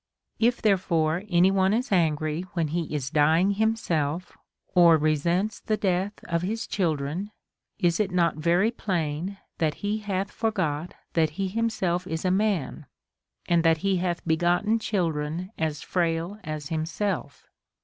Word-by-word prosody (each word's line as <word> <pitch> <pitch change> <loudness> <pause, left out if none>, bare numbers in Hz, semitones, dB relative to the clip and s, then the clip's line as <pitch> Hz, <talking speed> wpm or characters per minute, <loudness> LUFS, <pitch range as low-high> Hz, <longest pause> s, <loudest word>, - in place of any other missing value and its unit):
If 240 +2 +2
therefore 175 -3 +2
any 180 +1 +4
one 195 +1 +3
is 250 +2 -2
angry 155 -3 +1
when 165 -4 0
he 165 0 -2
is 140 -4 -3
dying 160 +6 +4
himself, 185 -7 -1 0.4
or 170 -3 +7
resents 170 +7 0
the 215 - -1
death 190 +1 -1
of 170 -1 -1
his 220 +6 -2
children, 165 +1 -1 0.5
is 175 -4 +1
it 210 -2 +1
not 175 -3 +1
very 175 +7 +2 0.2
|)lain, 170 +1 -1 0.2
that 155 -3 +1
he 210 +2 0
hath 200 -2 -2
forgot 180 -8 -2 0.2
that 160 -2 +3
he 195 -1 -1
himself 185 -5 -1
is 160 +2 -3
a 185 - +3
man 190 -7 0 0.6
and 170 -1 +3
that 165 -1 +4
he 195 -1 +3
hath 175 -1 -2
begotten 175 +7 +2
children 170 -3 -2
as 155 -2 -2
frail 170 +3 -1
as 155 -2 -5
himself? 160 -1 -3
175 Hz, 145 wpm, -26 LUFS, 160-195 Hz, 0.6 s, or